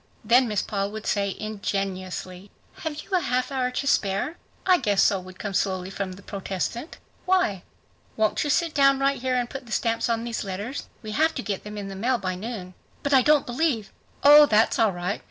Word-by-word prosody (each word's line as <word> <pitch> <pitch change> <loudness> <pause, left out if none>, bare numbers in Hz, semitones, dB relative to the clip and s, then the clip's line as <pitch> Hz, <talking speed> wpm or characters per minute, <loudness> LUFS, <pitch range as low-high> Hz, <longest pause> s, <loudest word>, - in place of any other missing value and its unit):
Then 245 +3 +5
Miss 210 -2 0
Paul 200 -1 -2
would 220 0 -6
say 200 -2 0
ingenuously, 195 -2 -4 0.3
"Have 300 -2 -5
you - - -21
a 370 - +3
half 255 -4 -1
hour 255 -2 0
to 250 - -3
spare?" 205 - +1 0.3
"I 365 -2 +5
guess 205 -2 +2
so," 200 -2 +3
would 185 0 -12
come 205 0 -5
slowly 190 -1 -1
from 195 -1 -4
the 195 - -13
protestant. 200 - -4 0.3
"Why?" 365 - +2 0.6
"Won't 215 -1 +1
you 295 - -2
please - - +4
sit 335 -3 0
down 275 -1 +5
right 275 -1 +1
here 255 0 0
and 245 -1 0
put 265 0 -8
the - - -12
stamps 230 +1 0
on 230 0 0
these 235 -1 -3
letters? 205 +7 -5 0.2
We 215 - -6
have 315 +7 +2
to 255 - -3
get 200 -3 -3
them 210 0 -8
in 200 -1 -5
the 195 - -7
mail 245 +6 +1
by 185 -4 -3
noon." 185 -1 -6 0.3
"But 285 0 0
I 265 - +7
don't 295 +2 +4
believe 245 -4 -1 0.2
…" - - -33
"Oh, 295 +1 +9
that's 220 -2 +3
all 220 -3 +4
right. 180 +3 -3
220 Hz, 220 wpm, -25 LUFS, 195-270 Hz, 0.6 s, Oh